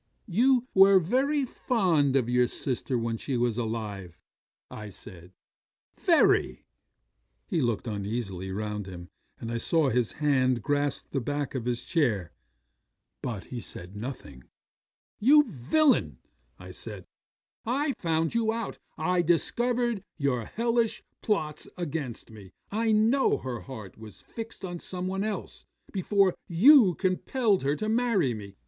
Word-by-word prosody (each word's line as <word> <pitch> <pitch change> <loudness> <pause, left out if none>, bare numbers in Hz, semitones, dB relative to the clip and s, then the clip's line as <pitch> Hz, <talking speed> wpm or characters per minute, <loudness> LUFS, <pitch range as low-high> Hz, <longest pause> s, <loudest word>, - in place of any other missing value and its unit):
'"You 245 +5 +3
were 195 0 +7
very 265 - +1
fond 175 - +1
of 130 -4 +2
your 125 0 +3
sister 125 0 -2
when 115 0 -2
she 130 +2 -3
was 120 -1 0
alive," 105 -6 -4 0.5
I 105 -1 -7
said. 90 -2 -12 0.6
"Very." 65 - +3 0.8
'He 165 - -1
looked 120 -4 -1
uneasily 100 -3 -4
round 105 0 -4
him, 90 -2 -9 0.3
and 115 - -5
I 115 - -2
saw 155 +3 +2
his 125 -2 0
hand 130 -6 +1
grasp 145 -1 -1
the 135 - -1
back 145 +2 -3
of 125 -4 -3
his 125 0 -2
chair; 125 - 0 0.9
but 110 -7 -4
he 120 - -3
said 90 -1 -7
nothing. 105 - -8 0.7
'"You 295 +7 +7
villain," 140 - +2 0.5
said 100 0 -8 0.6
I, 275 +6 0
"I - - 0
found 165 -1 0
you 230 -1 +1
out: 230 -2 -4 0.2
I 180 -1 +1
discovered 235 +6 +1
your 130 -6 0
hellish 230 - 0 0.2
plots 155 -8 -2
against 145 -9 -5
me; 105 -4 -12 0.2
I 225 +2 +1
know 225 +6 +3
her 125 -3 -5
heart 110 -8 -10
was 110 -1 -12
fixed 225 -3 -8
on 175 -1 -5
some 180 +1 -5
one 190 +1 -2
else 215 0 -5 0.3
before 195 -1 +2
you 205 - +6
compelled 200 +3 +1
her 140 +2 +1
to 215 - -3
marry 220 - +2
me. 100 -3 -9
145 Hz, 140 wpm, -28 LUFS, -, 0.9 s, were